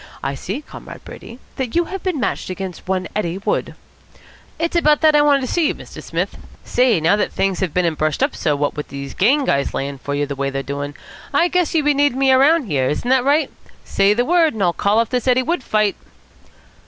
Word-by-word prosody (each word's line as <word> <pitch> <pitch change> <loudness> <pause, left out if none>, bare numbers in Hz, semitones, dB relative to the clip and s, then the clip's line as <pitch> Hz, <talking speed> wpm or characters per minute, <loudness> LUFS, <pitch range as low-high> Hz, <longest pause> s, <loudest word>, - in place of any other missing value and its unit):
I 135 - -1
see, 200 - -5
Comrade - - -11
Brady, 235 - -11 0.2
that 255 -4 -3
you 345 0 +3
have 385 +1 -6
been 365 -6 -2
matched 240 - -2
against 185 -1 -6
one 185 -1 -1
Eddie 185 -4 -1
Wood." 195 - -2 0.8
"It's 335 +1 -2
about 300 -3 +3
that 310 -1 +5
I 295 - +6
wanted 290 -2 +4
to 255 - -3
see 340 -3 +2
you, - - -1
Mr. - - -11
Smith. - - -3 0.3
Say, 245 -7 +2
now 165 +5 +3
that 210 - -1
things 195 -2 -1
have 185 -4 -1
been 180 +2 +1
and 165 -2 0
brushed 155 -1 0
up - - 0
so, 150 - 0
what 145 0 -1
with 150 - -5
these 140 -1 -7
gang 270 +9 +2
guys 140 - 0
layin' 140 0 -4
for 140 +1 -4
you 145 0 0
the 140 0 -5
way 140 0 -2
they're 135 0 -4
doin', 145 +1 -5 0.4
I 350 - +4
guess 360 -2 0
you'll 305 -2 +2
be 295 - +4
needin' 285 -2 +2
me 270 0 +3
around 285 +5 +5
here. 140 - 0
Isn't 240 +11 -2
that 260 -1 +4
right? 290 +4 +2 0.3
Say 200 +1 +2
the 245 +2 +1
word 330 -4 +3
and 205 - -1
I'll 175 -1 +2
call 205 +4 +1
off 230 0 +1
this 250 0 -1
Eddie 255 0 +3
Wood 330 +1 -1
fight." 215 -4 +1
220 Hz, 240 wpm, -19 LUFS, -, 0.8 s, I